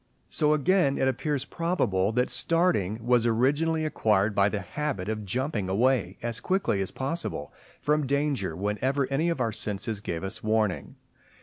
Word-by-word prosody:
So 150 Hz, 0 st, +3 dB
again 155 Hz, -1 st, +2 dB
it 130 Hz, -, +2 dB
appears 140 Hz, +1 st, -1 dB
probable 110 Hz, -, 0 dB
that 125 Hz, +1 st, +1 dB
starting 125 Hz, -, +1 dB
was 120 Hz, -1 st, +3 dB
originally 145 Hz, +8 st, +2 dB
acquired 105 Hz, -8 st, +2 dB
by 100 Hz, 0 st, +3 dB
the 105 Hz, -1 st, -3 dB
habit 120 Hz, -1 st, -3 dB
of 110 Hz, -1 st, -3 dB
jumping 115 Hz, -2 st, -2 dB
away 105 Hz, -2 st, +1 dB
as 120 Hz, 0 st, -2 dB
quickly 185 Hz, -, 0 dB
as 95 Hz, -, 0 dB
possible 160 Hz, +6 st, -4 dB, 0.3 s
from 150 Hz, -1 st, +1 dB
danger, 140 Hz, -, 0 dB
whenever 105 Hz, -, 0 dB
any 155 Hz, +5 st, +1 dB
of 170 Hz, -, -1 dB
our 115 Hz, -3 st, +1 dB
senses 105 Hz, +1 st, -3 dB
gave 85 Hz, -4 st, -4 dB
us 105 Hz, +4 st, -4 dB
warning. 110 Hz, -3 st, 0 dB
125 Hz, 160 wpm, -27 LUFS, 105-150 Hz, 0.3 s, So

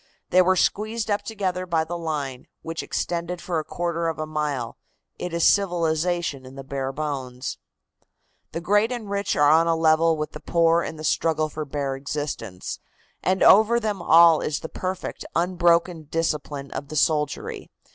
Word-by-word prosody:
They 185 Hz, -, +6 dB
were 185 Hz, +1 st, +3 dB
squeezed 215 Hz, +3 st, 0 dB
up 205 Hz, -, +1 dB
together 185 Hz, -4 st, -3 dB
by 165 Hz, -2 st, +1 dB
the 165 Hz, +2 st, -5 dB
line, 145 Hz, -6 st, -4 dB, 0.2 s
which 165 Hz, 0 st, -4 dB
extended 175 Hz, +1 st, -3 dB
for 170 Hz, -2 st, -2 dB
a -, -, -3 dB
quarter 170 Hz, 0 st, -2 dB
of 165 Hz, -, -2 dB
a 155 Hz, -, -3 dB
mile. 150 Hz, -6 st, -3 dB, 0.4 s
It 180 Hz, -, -4 dB
is 170 Hz, 0 st, +1 dB
civilization 175 Hz, -5 st, +1 dB
in 130 Hz, +1 st, -12 dB
the 135 Hz, -, -8 dB
bare 135 Hz, 0 st, -3 dB
bones. 135 Hz, -3 st, -4 dB, 0.9 s
"The 165 Hz, -, -4 dB
great 205 Hz, +6 st, +2 dB
and 225 Hz, -5 st, -5 dB
rich 200 Hz, -1 st, -1 dB
are 145 Hz, 0 st, +5 dB
on 165 Hz, +2 st, +5 dB
a 165 Hz, -, +3 dB
level 160 Hz, 0 st, +3 dB
with 150 Hz, 0 st, -3 dB
the 150 Hz, -, -9 dB
poor 165 Hz, 0 st, +3 dB
in 160 Hz, -, -5 dB
the 155 Hz, -, -9 dB
struggle 155 Hz, 0 st, +1 dB
for 155 Hz, +1 st, -5 dB
bare 140 Hz, -1 st, -3 dB
existence, 140 Hz, -9 st, -5 dB, 0.4 s
and 190 Hz, +1 st, +1 dB
over 220 Hz, +4 st, +6 dB
them 210 Hz, -5 st, -2 dB
all 165 Hz, -1 st, +6 dB
is 150 Hz, -, -2 dB
the 160 Hz, -, -6 dB
perfect, 185 Hz, 0 st, -5 dB
unbroken 170 Hz, -1 st, +2 dB
discipline 150 Hz, -3 st, -2 dB
of 140 Hz, -, -5 dB
the 155 Hz, -, -7 dB
soldiery. 150 Hz, -1 st, 0 dB
165 Hz, 175 wpm, -24 LUFS, 150-180 Hz, 0.9 s, They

